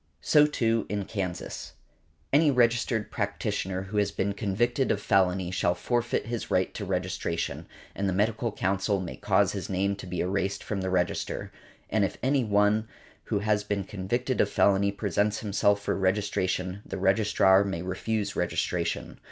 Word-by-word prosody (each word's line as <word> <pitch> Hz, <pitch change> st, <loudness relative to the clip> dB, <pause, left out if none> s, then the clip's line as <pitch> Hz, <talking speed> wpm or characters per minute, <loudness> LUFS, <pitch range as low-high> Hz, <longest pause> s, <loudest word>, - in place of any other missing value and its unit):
So, 150 Hz, -1 st, +5 dB
too, 115 Hz, -6 st, 0 dB
in 100 Hz, -1 st, -2 dB
Kansas. 95 Hz, -4 st, -5 dB, 0.6 s
Any 150 Hz, +2 st, +5 dB
registered 120 Hz, -3 st, +2 dB
practitioner 95 Hz, 0 st, -2 dB
who 100 Hz, +2 st, -5 dB
has 105 Hz, -1 st, +2 dB
been 100 Hz, +1 st, -1 dB
convicted 120 Hz, +6 st, 0 dB
of 100 Hz, -, 0 dB
felony 95 Hz, -2 st, +2 dB
shall 90 Hz, -1 st, +1 dB
forfeit 120 Hz, +3 st, -1 dB
his 115 Hz, 0 st, -4 dB
right 95 Hz, 0 st, +1 dB
to 105 Hz, -, -5 dB
registration, 90 Hz, -3 st, -2 dB, 0.3 s
and 100 Hz, 0 st, -1 dB
the -, -, 0 dB
Medical 110 Hz, +4 st, 0 dB
Council 100 Hz, +1 st, 0 dB
may 90 Hz, -2 st, -5 dB
cause -, -, +2 dB
his -, -, -5 dB
name 100 Hz, +1 st, 0 dB
to 100 Hz, -, -9 dB
be 90 Hz, -1 st, -4 dB
erased 95 Hz, +1 st, -1 dB
from 100 Hz, -3 st, -3 dB
the 95 Hz, -, -2 dB
register; 90 Hz, -1 st, -1 dB, 0.4 s
and 110 Hz, -2 st, +1 dB
if 95 Hz, -, -1 dB
any 135 Hz, 0 st, +2 dB
one 105 Hz, 0 st, +2 dB, 0.4 s
who 100 Hz, -, -1 dB
has 105 Hz, -1 st, +1 dB
been 100 Hz, -1 st, -2 dB
convicted 120 Hz, +7 st, -1 dB
of 105 Hz, -, +2 dB
felony 100 Hz, 0 st, +3 dB
presents 100 Hz, +1 st, 0 dB
himself 100 Hz, -1 st, +1 dB
for -, -, 0 dB
registration 95 Hz, -1 st, 0 dB
the -, -, -6 dB
registrar 95 Hz, 0 st, +4 dB
may 95 Hz, -4 st, -3 dB
refuse 100 Hz, +3 st, -2 dB
registration. 85 Hz, -2 st, -2 dB
100 Hz, 160 wpm, -27 LUFS, 95-110 Hz, 0.6 s, So